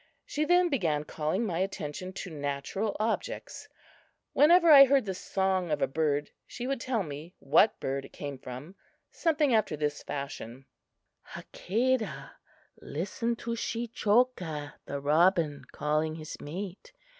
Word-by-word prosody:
She 305 Hz, +1 st, -1 dB
then 355 Hz, +2 st, +4 dB
began 165 Hz, -, 0 dB
calling 155 Hz, +8 st, -2 dB
my 175 Hz, -5 st, -2 dB
attention 185 Hz, -2 st, -3 dB
to 185 Hz, -1 st, -6 dB
natural 145 Hz, +8 st, -3 dB
objects. 220 Hz, +1 st, -3 dB, 0.6 s
Whenever 335 Hz, +2 st, +6 dB
I 275 Hz, -2 st, +11 dB
heard 270 Hz, -3 st, +3 dB
the 190 Hz, -, -2 dB
song 190 Hz, -1 st, -1 dB
of 150 Hz, -, 0 dB
a -, -, +3 dB
bird, 145 Hz, 0 st, 0 dB, 0.2 s
she 245 Hz, -, -6 dB
would 270 Hz, -2 st, -2 dB
tell 245 Hz, -6 st, 0 dB
me 155 Hz, +2 st, -8 dB
what 155 Hz, +10 st, +3 dB
bird 135 Hz, +1 st, -3 dB
it -, -, -14 dB
came 140 Hz, -2 st, -6 dB
from, 130 Hz, +8 st, -8 dB, 0.4 s
something 300 Hz, -5 st, +2 dB
after 215 Hz, -8 st, +2 dB
this 145 Hz, -1 st, -2 dB
fashion: 135 Hz, -3 st, -6 dB, 0.7 s
"Hakadah, 220 Hz, -, -1 dB, 0.5 s
listen 205 Hz, +9 st, -2 dB
to 235 Hz, -, -5 dB
Shechoka 225 Hz, -9 st, 0 dB
(the 140 Hz, -, -3 dB
robin) 150 Hz, -1 st, +2 dB
calling 155 Hz, +1 st, 0 dB
his 155 Hz, -1 st, -7 dB
mate. 190 Hz, -, -7 dB
180 Hz, 135 wpm, -29 LUFS, 145-235 Hz, 0.7 s, I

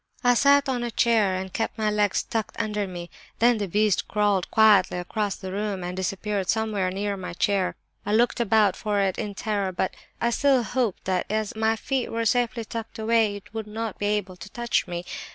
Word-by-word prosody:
I 245 Hz, 0 st, +5 dB
sat 280 Hz, +3 st, +4 dB
on 250 Hz, -2 st, -1 dB
a 240 Hz, -, -2 dB
chair 225 Hz, -5 st, +2 dB
and 185 Hz, 0 st, -5 dB
kept 225 Hz, 0 st, -2 dB
my 215 Hz, -1 st, +1 dB
legs 210 Hz, -2 st, +1 dB
tucked 220 Hz, -2 st, -4 dB
under 210 Hz, -3 st, -1 dB
me. 175 Hz, -2 st, -8 dB, 0.3 s
Then 235 Hz, -1 st, +4 dB
the 200 Hz, -, -1 dB
beast 210 Hz, +1 st, +1 dB
crawled 205 Hz, -3 st, +1 dB
quietly 210 Hz, -5 st, +5 dB
across 200 Hz, +3 st, -2 dB
the 190 Hz, -1 st, -7 dB
room 200 Hz, -1 st, -3 dB
and 180 Hz, 0 st, -4 dB
disappeared 195 Hz, +1 st, -2 dB
somewhere 215 Hz, -4 st, 0 dB
near 200 Hz, +2 st, -2 dB
my 185 Hz, -3 st, -6 dB
chair. 190 Hz, +1 st, 0 dB, 0.3 s
I 205 Hz, -, -2 dB
looked 240 Hz, +2 st, +2 dB
about 215 Hz, -4 st, +3 dB
for 210 Hz, -2 st, -1 dB
it 195 Hz, -2 st, 0 dB
in 210 Hz, -3 st, -4 dB
terror, 200 Hz, -2 st, -1 dB
but 185 Hz, +1 st, -2 dB, 0.3 s
I 235 Hz, -, +1 dB
still 270 Hz, 0 st, +3 dB
hoped 230 Hz, -1 st, -1 dB
that 185 Hz, -1 st, 0 dB
as 215 Hz, 0 st, -2 dB
my 220 Hz, 0 st, +2 dB
feet 260 Hz, +3 st, -2 dB
were 230 Hz, 0 st, -1 dB
safely 235 Hz, 0 st, +1 dB
tucked 225 Hz, 0 st, -6 dB
away 220 Hz, -1 st, +2 dB
it 205 Hz, +3 st, -12 dB
would 220 Hz, -1 st, -4 dB
not 220 Hz, 0 st, -5 dB
be 205 Hz, -, 0 dB
able 205 Hz, -3 st, -1 dB
to 200 Hz, -, -10 dB
touch 235 Hz, -3 st, -1 dB
me. 175 Hz, 0 st, -5 dB
210 Hz, 205 wpm, -25 LUFS, 195-225 Hz, 0.3 s, I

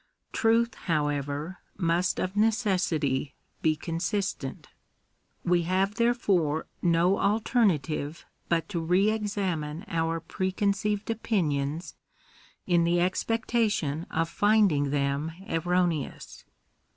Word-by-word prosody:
Truth, 230 Hz, +1 st, +2 dB, 0.2 s
however, 145 Hz, +2 st, -1 dB, 0.2 s
must 175 Hz, 0 st, +1 dB
of 185 Hz, +2 st, -2 dB
necessity 185 Hz, -, +1 dB, 0.3 s
be 155 Hz, -1 st, +3 dB
consistent. 165 Hz, -2 st, -3 dB, 0.8 s
We 175 Hz, 0 st, +3 dB
have 190 Hz, +2 st, +2 dB
therefore 200 Hz, -10 st, +1 dB, 0.2 s
no 175 Hz, +2 st, +3 dB
alternative 175 Hz, -, +1 dB, 0.2 s
but 165 Hz, -1 st, +1 dB
to 180 Hz, -5 st, -2 dB
re 180 Hz, +6 st, +3 dB
examine 190 Hz, -7 st, -2 dB
our 165 Hz, 0 st, -1 dB
pre 185 Hz, +3 st, -3 dB
conceived 205 Hz, +2 st, 0 dB
opinions, 165 Hz, -8 st, -1 dB, 0.7 s
in 175 Hz, -2 st, +3 dB
the 170 Hz, +1 st, +2 dB
expectation 195 Hz, -4 st, 0 dB
of 165 Hz, +1 st, 0 dB
finding 205 Hz, -9 st, +3 dB
them 140 Hz, +2 st, -1 dB
erro 180 Hz, +1 st, +2 dB
neous. 155 Hz, -5 st, -5 dB
175 Hz, 100 wpm, -28 LUFS, 155-205 Hz, 0.8 s, be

